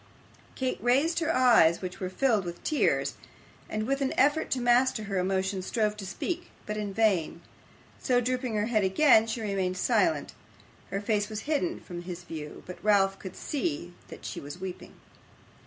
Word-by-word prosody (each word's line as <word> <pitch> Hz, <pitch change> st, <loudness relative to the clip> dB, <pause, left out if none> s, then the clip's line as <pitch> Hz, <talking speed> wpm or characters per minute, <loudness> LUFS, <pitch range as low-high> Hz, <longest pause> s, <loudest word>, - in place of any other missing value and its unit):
Kate 260 Hz, -1 st, -2 dB
raised 280 Hz, +8 st, +2 dB
her 330 Hz, -1 st, 0 dB
eyes, 235 Hz, -, +5 dB
which 185 Hz, -1 st, -6 dB
were 185 Hz, -, -3 dB
filled 220 Hz, 0 st, +2 dB
with 175 Hz, -1 st, -7 dB
tears; 305 Hz, -, +1 dB, 0.6 s
and 215 Hz, 0 st, -2 dB
with 275 Hz, +3 st, -1 dB
an 270 Hz, -, 0 dB
effort 290 Hz, +3 st, +3 dB
to 260 Hz, -, 0 dB
master 245 Hz, -1 st, +3 dB
her 200 Hz, -2 st, -2 dB
emotion 190 Hz, +1 st, 0 dB
strove 210 Hz, +2 st, 0 dB
to 200 Hz, -2 st, -7 dB
speak, 350 Hz, -, -4 dB, 0.2 s
but 210 Hz, -, -3 dB
in 210 Hz, -1 st, -3 dB
vain. 195 Hz, -7 st, +1 dB, 0.6 s
So 250 Hz, -1 st, +3 dB
drooping 250 Hz, -1 st, -1 dB
her 210 Hz, 0 st, +1 dB
head 220 Hz, -3 st, +1 dB
again, 220 Hz, +3 st, +5 dB
she 225 Hz, +1 st, -3 dB
remained 190 Hz, -3 st, -1 dB
silent. 245 Hz, -, +1 dB, 0.6 s
Her 195 Hz, -, -2 dB
face 205 Hz, 0 st, 0 dB
was 215 Hz, -1 st, -4 dB
hidden 315 Hz, +4 st, -1 dB
from 175 Hz, -2 st, -8 dB
his 175 Hz, 0 st, -7 dB
view, 155 Hz, -4 st, -8 dB
but 180 Hz, -, -10 dB
Ralph 195 Hz, -2 st, +3 dB
could 190 Hz, -2 st, -8 dB
see 175 Hz, -, -3 dB
that -, -, -11 dB
she -, -, -5 dB
was 145 Hz, +4 st, -8 dB
weeping. 185 Hz, -1 st, -7 dB
215 Hz, 175 wpm, -28 LUFS, 190-255 Hz, 0.6 s, eyes